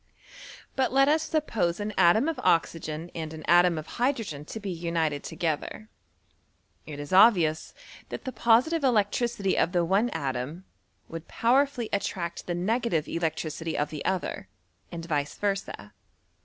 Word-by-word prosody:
But 265 Hz, -1 st, +1 dB
let 275 Hz, +1 st, +4 dB
us 310 Hz, +2 st, +3 dB
suppose 230 Hz, -, -1 dB
an 210 Hz, +1 st, -3 dB
atom 215 Hz, -, +4 dB
of 325 Hz, -, -2 dB
oxygen 165 Hz, 0 st, 0 dB
and 160 Hz, -2 st, -5 dB
an 155 Hz, -, -9 dB
atom 175 Hz, +1 st, +5 dB
cf 155 Hz, -1 st, -5 dB
hydrogen 225 Hz, -, -2 dB
to 220 Hz, -, -7 dB
be 200 Hz, -2 st, -4 dB
united 165 Hz, -4 st, -1 dB
together, 165 Hz, +6 st, -3 dB, 1.0 s
it 145 Hz, -2 st, -7 dB
is 145 Hz, +4 st, -6 dB
obvious 180 Hz, -6 st, +4 dB, 0.3 s
that -, -, -7 dB
the 260 Hz, -, -3 dB
positive 255 Hz, +8 st, +3 dB
electricity 220 Hz, -3 st, +1 dB
of 175 Hz, -, +1 dB
the 175 Hz, -1 st, +2 dB
one 200 Hz, +7 st, +2 dB
atom 140 Hz, -, -4 dB, 0.4 s
would 165 Hz, 0 st, -8 dB
power 260 Hz, +5 st, +3 dB
ittlly 245 Hz, -5 st, -5 dB
attract 175 Hz, -3 st, -3 dB
the 175 Hz, -, -1 dB
negative 200 Hz, -3 st, 0 dB
electricity 160 Hz, -1 st, -3 dB
of 145 Hz, -, -1 dB
the 150 Hz, -2 st, -5 dB
other, 185 Hz, -, -2 dB, 0.4 s
and 165 Hz, -1 st, -6 dB
vice 145 Hz, -3 st, -2 dB
versd. 200 Hz, -1 st, -3 dB
175 Hz, 150 wpm, -27 LUFS, 160-230 Hz, 1.0 s, atom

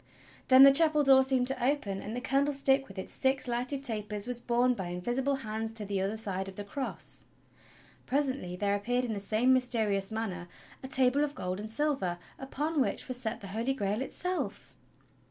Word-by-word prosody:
Then 260 Hz, 0 st, +8 dB
the 275 Hz, -, +10 dB
chapel 305 Hz, +1 st, +5 dB
door 265 Hz, -1 st, +6 dB
seemed 260 Hz, -2 st, +1 dB
to 270 Hz, -, -3 dB
open, 245 Hz, -8 st, 0 dB
and 215 Hz, +3 st, -6 dB
the 245 Hz, -, -3 dB
candlestick 275 Hz, 0 st, +1 dB
with 195 Hz, -, -13 dB
its 190 Hz, -, -3 dB
six 265 Hz, -1 st, +1 dB
lighted 250 Hz, +3 st, -1 dB
tapers 210 Hz, -4 st, -2 dB
was 245 Hz, -1 st, -3 dB
borne 245 Hz, +1 st, +2 dB
by 190 Hz, -7 st, -5 dB
invisible 240 Hz, +11 st, -1 dB
hands 220 Hz, -3 st, -4 dB
to 220 Hz, -2 st, 0 dB
the 195 Hz, -1 st, -2 dB
other 200 Hz, +3 st, -2 dB
side 195 Hz, -3 st, -3 dB
of 190 Hz, -, -12 dB
the 205 Hz, -, -5 dB
cross. 260 Hz, +7 st, -4 dB, 0.8 s
Presently 260 Hz, -9 st, -1 dB
there 200 Hz, +2 st, 0 dB
appeared 245 Hz, +5 st, 0 dB
in 230 Hz, -, -3 dB
the 205 Hz, -, -3 dB
same 220 Hz, +6 st, +2 dB
mysterious 220 Hz, -6 st, +1 dB
manner 195 Hz, -6 st, -4 dB, 0.3 s
a 265 Hz, -, -7 dB
table 265 Hz, +1 st, +3 dB
of 295 Hz, 0 st, -3 dB
gold 185 Hz, +1 st, -4 dB
and 215 Hz, +1 st, -6 dB
silver 225 Hz, -8 st, 0 dB, 0.2 s
upon 295 Hz, +3 st, -2 dB
which -, -, -1 dB
was 255 Hz, -, -4 dB
set 230 Hz, -2 st, -4 dB
the 195 Hz, -, -8 dB
Holy 230 Hz, +7 st, -1 dB
Grail 205 Hz, -1 st, -1 dB
itself! 360 Hz, +6 st, -3 dB
245 Hz, 190 wpm, -30 LUFS, 205-270 Hz, 0.8 s, the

